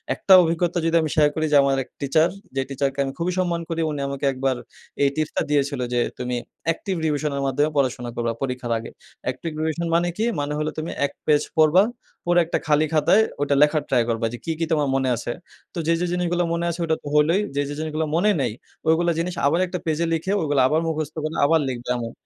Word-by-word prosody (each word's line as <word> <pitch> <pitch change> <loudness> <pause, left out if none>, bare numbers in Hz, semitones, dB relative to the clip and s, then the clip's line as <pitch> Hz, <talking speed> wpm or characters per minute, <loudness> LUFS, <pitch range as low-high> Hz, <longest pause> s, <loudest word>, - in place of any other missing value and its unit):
একটা 195 - +4
অভিজ্ঞতা 170 +1 0
যদি 165 0 +2
আমি 155 - -1
শেয়ার 150 -1 +5
করি 155 - 0
যে, - - +4
আমার 135 -1 +2
১ - - -24
টিচার; 155 +4 +3 0.3
যে 135 - +1
টিচারকে 135 0 -2
আমি 135 - -4
খুবই 175 +2 -1
সম্মান 175 -2 0
করি। 165 0 -1
উনি 145 - -4
আমাকে 140 0 -3
একবার 130 0 0 0.5
এই 140 - +5
টিপসটা 155 -1 -1
দিয়েছিল 140 -2 +1
যে, 120 - +2 0.2
"তুমি 125 0 -3 0.4
active 190 +2 -4
revision 150 -1 0
এর - - -1
মাধ্যমে 145 +3 +1
পড়াশোনা 125 -3 0
করবা 115 -1 -1
পরীক্ষার 125 -3 -3
আগে। 115 - -7 0.4
active 165 - -6
revision 160 +2 -1
মানে 170 +1 +2
কি? 220 - +1
মানে 145 +1 -2
হলো 155 0 -1
তুমি 155 +1 -3
১ - - -3 0.2
পেজ 150 -1 +4 0.2
পড়বা, 160 +4 +6 0.4
পড়ে 175 0 +4
একটা 165 - -1
খালি 150 0 +3
খাতায় 160 +8 +4 0.2
ওইটা 145 0 +2
লেখার 150 0 +4
ট্রাই 125 -3 +3
করবা; 115 0 0
যে 120 - -4
কি, 165 - -1
কি 165 - +1
তোমার 150 -3 +2
মনে 135 -1 +1
আছে। 120 - -4 0.4
তো - - -8
যে, 165 - +4
যে - - +1
জিনিসগুলা 175 0 0
মনে 170 0 -1
আছে 170 +1 -4
ওটা 160 -1 +1
তো - - -8
হলোই। 160 +6 +4
যে, 145 - +2
যে - - -4
জিনিসগুলো 155 0 -2
মনে 200 +5 +3
নেই, 120 -5 -1 0.4
ঐগুলা 170 +2 +3
জিনিস 175 +2 -2
আবার 165 +4 +2
একটা 180 0 -4
পেজ 160 -1 0
এ - - -2
লিখে 165 +4 -1
ওগুলা 145 -4 +2
আবার 155 +4 +1
মুখস্থ 155 -1 -3
করে 155 +1 -3
আবার 160 +2 +4
লিখবে 120 -1 -6
এমন।" 115 -1 -4
155 Hz, 225 wpm, -23 LUFS, 140-165 Hz, 0.5 s, পড়বা